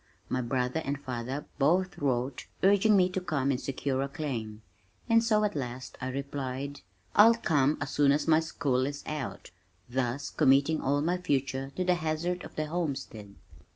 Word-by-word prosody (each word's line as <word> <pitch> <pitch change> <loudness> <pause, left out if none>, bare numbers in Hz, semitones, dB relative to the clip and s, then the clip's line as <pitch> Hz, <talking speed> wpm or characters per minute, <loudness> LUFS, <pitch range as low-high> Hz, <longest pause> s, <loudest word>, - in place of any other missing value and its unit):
My 130 - 0
brother 125 +4 -1
and 140 0 -2
father 130 +1 -4
both 175 +6 +2
wrote 130 -2 -1 0.2
urging 200 +2 +5
me 180 -1 +5
to 185 0 -3
come 140 -6 0
and 125 - -1
secure 135 0 -2
a 135 - -1
claim, 115 -9 -5 0.4
and 230 -1 +4
so 215 -2 +3
at 210 - 0
last 125 -2 -5
I 130 - -2
replied, 140 0 -4 0.3
"I'll 225 +3 +8
come 150 - +2
as 145 -1 -4
soon 145 -1 +4
as 145 +3 +1
my 160 -1 +6
school 135 -5 0
is 145 0 -6
out," 150 -4 -5 0.4
thus 125 +2 -2
committing 140 +4 +3
all 140 +2 +1
my 175 +4 0
future 135 -4 -1
to 185 - 0
the 180 0 +3
hazard 175 +2 -2
of - - -11
the 155 - -1
homestead. 140 - -4
140 Hz, 175 wpm, -29 LUFS, 130-165 Hz, 0.4 s, I'll